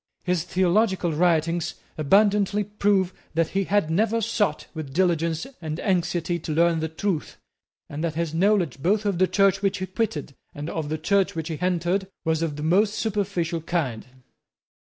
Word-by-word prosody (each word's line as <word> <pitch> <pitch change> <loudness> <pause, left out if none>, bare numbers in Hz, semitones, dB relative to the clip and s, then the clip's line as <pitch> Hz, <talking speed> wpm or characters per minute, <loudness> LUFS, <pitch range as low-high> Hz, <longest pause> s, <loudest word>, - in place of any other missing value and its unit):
His 180 -2 0
theological 185 -1 +1
writings 165 0 +1 0.2
abundantly 200 +5 +3
prove 200 -2 +1 0.2
that 165 -1 +2
he 195 0 0
had 195 -5 +1
never 220 +6 +2
sought 205 -7 0
with 150 -4 -7
diligence 170 -3 +1 0.2
and 155 0 -4
anxiety 175 -2 0
to 160 - -5
learn 170 0 +3
the 160 - -1
truth, 165 0 -3 0.5
and 145 +2 -5
that 165 -2 -1
his 165 -1 -2
knowledge 175 -6 +2
both 205 +7 +1
of 195 -4 0
the 185 - +4
Church 195 -1 +3
which 200 0 +1
he 185 - -3
quitted 185 -8 -3 0.2
and 150 +3 -5
of 155 -3 -3
the 155 - -1
Church 195 +4 +1
which 160 0 -4
he 160 - -4
entered 180 +2 0 0.2
was 160 0 +1
of 160 -3 -1
the 150 - -5
most 200 +6 +3
superficial 190 -6 -1
kind. 145 -10 -2
175 Hz, 170 wpm, -24 LUFS, 160-195 Hz, 0.5 s, the